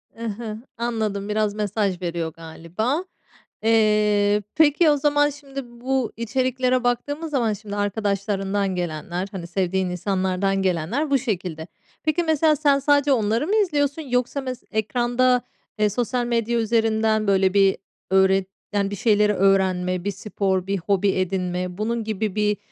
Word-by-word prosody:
Hı 230 +1 -7
hı, 215 0 -5 0.2
anladım, 215 -4 -2
biraz 210 -1 0
mesaj 205 -3 -1
veriyor 170 -2 -3
galiba. 170 - -3 0.6
Eee, 210 -2 +3
peki, 315 +1 +5
o 290 - +4
zaman, 290 +1 +3
şimdi, 275 -1 -8
bu 245 +1 -2
içeriklere 255 +2 0
baktığımız 290 +6 -1
zaman, 235 -6 +1
şimdi, 205 0 -7
arkadaşlarından 200 -1 -1
gelenler, 175 +2 -3
hani, 175 -4 -6
sevdiğin 185 +1 -1
insanlardan 190 +1 0
gelenler 190 - -1
bu 275 - +5
şekilde. 185 - -4 0.4
Peki, 310 +3 +1
mesela, 315 -1 +3
sen 285 -2 +3
sadece 285 0 +3
onları 230 +4 +1
mı 420 - +1
izliyorsun 300 -7 +1
yoksa 250 0 -1
mes 255 -2 -6
ekranda, 245 +3 +1 0.4
eee, 210 -1 +3
sosyal 245 +2 -1
medya 235 0 0
üzerinden, 220 -1 +1
böyle, 190 -1 +3
bir 195 -1 +4 0.3
öğret 190 0 +3 0.3
yani, 200 -1 0
bir - - -3
şeyleri 210 0 +3
öğrenme, 185 -2 +2
bir 205 - -1
spor, 190 -1 -2
bir 195 0 0
hobi 195 +2 +1
edinme, 180 -1 -2
bunun 230 +2 -1
gibi 215 -2 -2
bir, 210 -1 +1
215 Hz, 145 wpm, -23 LUFS, 190-250 Hz, 0.6 s, peki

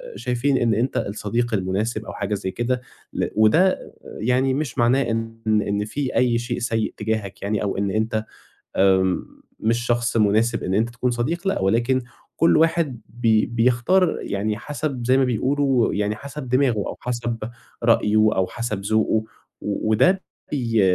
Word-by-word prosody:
شايفين 130 +2 0
إن 115 -2 +2
أنت 120 +5 0
الصديق 110 +4 -2
المناسب 105 +3 -1
أو - - -7
حاجة 105 +1 -3
زَي 95 -1 -4
كده 125 +3 -1 0.3
ل - - -1
وده 160 - +3
يعني 125 +4 0
مش 140 -2 -3
معناه 125 +2 +3
إن، 115 0 -3
إن 105 -1 +1
في 135 +4 -3
أي 120 -2 +3
شيء 120 0 -3
سيء 115 -2 -1
تجاهك 105 -2 -3
يعني 105 +1 -1
أو 100 - -2
إن 100 0 0
أنت 110 +1 -1 0.5
آآ، 95 -1 +3 0.4
مش 115 +2 0
شخص 120 0 +1
مناسب 110 +2 +2
إن 95 - -1
أنت 110 +4 +2
تكُون 125 +1 -1
صديق 165 +11 -2
لأ، - - +1
ولكن 120 +6 +2 0.4
كُلّ 165 0 +4
واحد 160 -6 +1
بي 115 -2 +2
بيختار 125 +10 +2
يعني 105 +2 -2
حَسَب 140 -1 -4
زَي 130 +2 +4
ما 135 - +4
بيقولوا 130 +1 +1
يعني 105 +1 0
حَسَب 140 +2 -8
دماغه، 125 -3 +2
أو 100 - -3
حَسَب 120 -1 -2 0.5
رأيُه 105 +1 +3 0.2
أو 95 -1 +1
حَسَب 115 -4 -4
ذوقُه 110 +1 +1 0.4
و 105 +1 -2
وده 135 - +4 0.3
بي 115 -6 +1
115 Hz, 160 wpm, -22 LUFS, 105-130 Hz, 0.5 s, كُلّ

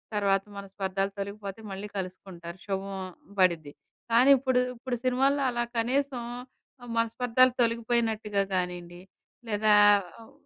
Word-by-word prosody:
తర్వాత 195 -1 +2
మనస్పర్ధాలు 195 0 -3
తొలగిపోతయి, 200 +1 -6
మళ్ళీ 195 +2 -5
కలుసుకుంటారు, 180 -2 -7
శుభం 195 0 -3 0.4
బడిద్ది. 170 -5 +2 0.4
కానీ 245 +4 +5
ఇప్పుడు, 260 -1 +1 0.2
ఇప్పుడు 245 +1 -4
సినిమాల్లో 270 +3 +2
అలా 240 0 -1 0.2
కనీసం 260 +1 0 0.6
ఆహ్, 240 - -8
మనస్పర్ధాలు 245 +2 +3
తొలగిపోయినట్టుగా 225 -3 0
గానీండి, 180 -1 -4 0.5
లేదా 210 0 +3 0.5
ఆహ్, 225 - -15
210 Hz, 110 wpm, -28 LUFS, 195-240 Hz, 0.6 s, కానీ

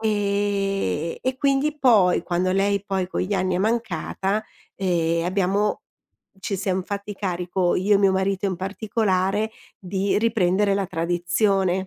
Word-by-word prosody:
e 200 - -1
e 260 0 -1
quindi 280 +2 +1
poi, 210 -11 +4
quando 180 +1 0
lei 200 +1 +1
poi 190 -2 -1
con - - -2
gli 200 +3 -1
anni 185 -1 0
è - - 0
mancata, 205 -1 -1 0.3
ehm, 170 -3 0
abbiamo 195 +3 +1 0.6
ci 195 +1 -2
siam 190 -1 -1
fatti 200 +2 -5
carico, 180 -2 -1
io 200 +3 +3
e - - +5
mio 195 -1 +4
marito 190 +1 0
in 190 -2 -2
particolare, 200 +1 0 0.3
di 195 +2 -1
riprendere 205 -3 +2
la 200 0 0
tradizione. 180 +3 +1
195 Hz, 140 wpm, -23 LUFS, 180-205 Hz, 0.6 s, e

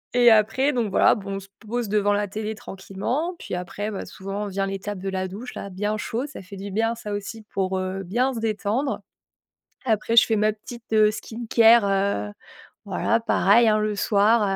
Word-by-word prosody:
Et 240 -1 +7
après, 225 +7 +3
donc 235 -4 0
voilà, 195 - +5
bon, 200 -3 -5
on - - -3
se 195 0 -14 0.2
pose 240 +1 -2
devant 205 0 +2
la 205 0 0
télé, 215 +2 -4
tranquillement. 215 - -4
Puis - - -8
après, 190 +4 -4
bah, 200 - -5
souvent, 195 +2 -5
vient 195 0 -1
l'étape 195 +1 -4
de 195 +1 -3
la 190 0 -2
douche, 210 +7 -8
là, 200 - -6
bien 205 +3 -2
chaud, 230 +4 -3
ça 295 - -9
fait 195 +1 -11
du 200 +1 -6
bien, 225 +3 0
ça 210 -2 -6
aussi, 205 +2 -6
pour 190 -1 0
heu, 185 +1 -3
bien 245 +9 0
se 235 - -4
détendre. 225 +5 -1 0.8
Après, 225 -1 +1
je 235 - +9
fais 225 - 0
ma 215 +1 +2
petite, 230 +2 -11
heu, 215 -1 +5
skincare, 225 +1 +3 0.4
heu, - - -10 0.5
voilà 230 - +1
pareil, 230 0 +4
hein, 215 0 +3
le 210 -1 -1
soir, 210 +3 +3
210 Hz, 200 wpm, -24 LUFS, 195-230 Hz, 0.8 s, je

